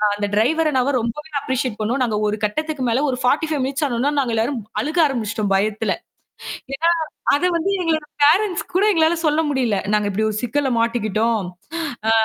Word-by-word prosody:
அந்த 205 0 -2
டிரைவர் 310 +9 +2
அண்ணாவ 265 -1 +1
ரொம்பவே 270 +7 -5
அப்ரிசியேட் 260 -5 -2
பண்ணோம். 235 +5 -1
நாங்க 220 -4 0
ஒரு 210 - 0
கட்டத்துக்கு 300 +6 -1
மேல 230 - +2
ஒரு 255 - -1
45 295 +2 +1
மினிட்ஸ் 275 +3 -2
ஆனாவொன்னே, 260 +1 0
நாங்க 250 -4 0
எல்லாரும் 235 +4 0 0.2
அழுக 310 +4 -1
ஆரம்பிச்சிட்டோம், 220 -6 -1
பயத்துல. 215 +2 0 0.8
ஏன்னா 330 +4 +2 0.5
அத 325 - 0
வந்து 335 +4 0
எங்களோட 315 -3 0 0.2
பேரண்ட்ஸ் 360 +6 +4
கூட 375 +3 +3
எங்களால 325 -2 +3
சொல்ல 300 0 +3
முடியல. 250 -7 +1 0.2
"நாங்க 210 -1 +2
இப்படி 210 +2 0
ஒரு 215 - -3
சிக்கல்ல 265 +3 0
மாட்டிக்கிட்டோம்." 225 -2 0 0.6
ஆ - - +5
260 Hz, 165 wpm, -21 LUFS, 220-305 Hz, 0.8 s, ஆ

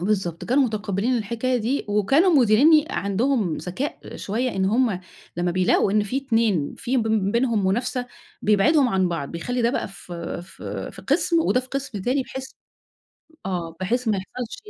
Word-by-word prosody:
بالضبط، 180 -3 -1
كانوا 265 +3 +3
متُقبِلين 215 +2 -1
الحكاية 235 +4 -1
دي، 245 +5 -1
وكانوا 270 - +3
مديريني 285 +6 +6
عندهم 200 - 0
ذكاء 255 +11 -5
شويّة 240 +5 -2
إن 190 - +1
هُم 220 -2 +1 0.4
لمّا 175 0 0
بيلاقوا 185 +2 +2
إن 210 0 +3
في 210 +6 -3
2 225 - +1
في 260 +2 -1
ب 235 - +2 0.3
بينهم 235 -4 +1
منافسة، 245 +5 -1 0.4
بيبعدهم 250 +7 +4
عن 190 -4 +1
بعض، 165 -5 -3
بيخلّي 245 +9 -2
ده 235 - +3
بقى - - -2
في 175 -3 -7
في 185 - -7
في - - -12
قسم 330 +4 +2
وده 255 -5 +2
في 255 - -12
قسم 265 -6 -4
تاني، 265 +4 +1
بحيث 265 +1 -8 0.9
آه 170 -3 -3
بحيث 235 +5 0
ما 210 - +2
يحصلش 225 +5 -6
225 Hz, 165 wpm, -23 LUFS, 190-255 Hz, 0.9 s, مديريني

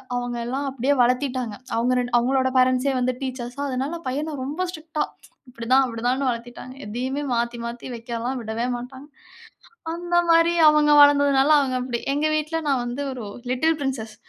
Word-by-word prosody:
அவங்க 245 0 -3
எல்லாம் 270 +3 -3
அப்டியே 270 +2 0
வளத்திட்டாங்க. 250 -3 0 0.2
அவங்க 240 +2 +1
2 245 0 -3
அவங்களோட 260 +2 +1
பேரன்ட்ஸே 255 +1 +3
வந்து 255 0 +1
டீச்சர்ஸா. 255 0 -5
அதனால 270 +6 -3
பையன 295 +4 -3
ரொம்ப 305 +7 -2
ஸ்ட்ரிக்ட்டா 315 -2 -3 0.5
"இப்படிதான். 250 +3 +2
அப்டிதான்னு." 245 +3 -1
வளர்த்திட்டாங்க. 240 +2 -6
எதையுமே 260 +6 -3
மாத்தி 235 0 -1
மாத்தி 235 +2 -6
வைக்கலாம் 235 +2 -4
விடவே 225 +3 -2
மாட்டாங்க. 260 +3 -10 0.9
அந்த 345 0 -4 0.2
மாரி 330 +1 +5 0.2
அவங்க 300 0 +4
வளந்ததுனால 285 -1 +5
அவங்க 260 -2 -1
அப்டி. 245 -2 -3
எங்க 300 +2 +1
வீட்ல 310 +2 -2
நான் 265 -3 +1
வந்து 260 +4 -4
ஒரு 240 -5 -7 0.3
"Little 320 +5 +1
Princess" 230 -5 -3
260 Hz, 150 wpm, -23 LUFS, 240-285 Hz, 0.9 s, மாரி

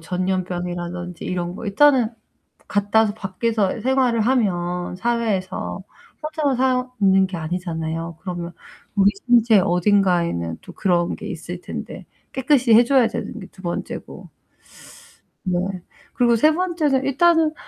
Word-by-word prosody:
전염병이라든지 180 -1 -3
이런 175 -1 -3
거. 230 - -7
일단은 255 +3 +4 0.5
그 - - -31
갖다 205 +2 +2
와서 210 -2 +1
밖에서 210 0 -1
생활을 255 -3 +2
하면 180 -7 0
사회에서 200 -5 -2 0.4
혼자만 305 -3 -1
사는 250 -7 +2
게 185 - -5
아니잖아요. 165 -1 -4
그러면 175 -2 -5 0.4
우리 200 0 +5 0.2
신체 230 -4 +5
어딘가에는 175 - +1
또 - - -11
그런 175 -3 +1
게 - - -8
있을 - - -6
텐데 - - -7 0.3
깨끗이 260 -3 +3
해 235 - +8
줘야 255 -1 +4
되는 225 - -5
게 - - -9
2 185 - -17
번째고. 175 -2 -6 1.2
뭐, 185 +1 -1 0.4
그리고 240 -2 +3
3 305 +8 +4
번째는 320 -6 0
일단은 320 +3 +3
200 Hz, 280 characters per minute, -21 LUFS, 180-250 Hz, 1.2 s, 해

